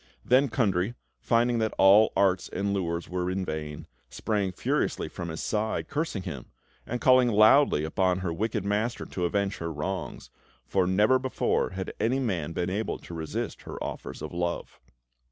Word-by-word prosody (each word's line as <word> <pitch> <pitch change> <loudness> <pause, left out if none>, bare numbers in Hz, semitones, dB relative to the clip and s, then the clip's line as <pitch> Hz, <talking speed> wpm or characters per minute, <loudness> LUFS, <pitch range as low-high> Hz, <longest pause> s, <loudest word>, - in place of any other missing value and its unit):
Then 130 +2 +4
Kundry, 105 -2 0 0.2
finding 120 0 +2
that 110 -1 -1
all 100 +3 +6
arts 95 -2 +2
and 100 +1 -2
lures 85 -3 -2
were 90 0 -2
in 95 0 -2
vain, 75 -2 -5 0.2
sprang 100 -4 -1
furiously - - -1
from 85 -1 -6
his 80 - -5
side, 110 0 -1
cursing 145 - -2
him, 65 -7 -6 0.4
and 125 - -3
calling 130 0 +5
loudly 110 - +5
upon 90 +3 +1
her 85 -3 -2
wicked 105 +2 -2
master 105 +4 -1
to 90 - -3
avenge 100 +2 0
her 85 0 -4
wrongs; 80 +3 -5 0.3
for 95 +6 +1
never 105 +8 +4
before 130 0 0
had 95 0 -5
any 125 +4 +1
man 95 - -1
been 90 +2 -2
able 105 +4 -2
to - - -11
resist 80 -2 -4
her - - -8
offers - - -6
of - - -6
love. 85 0 -3
95 Hz, 170 wpm, -27 LUFS, 90-110 Hz, 0.4 s, all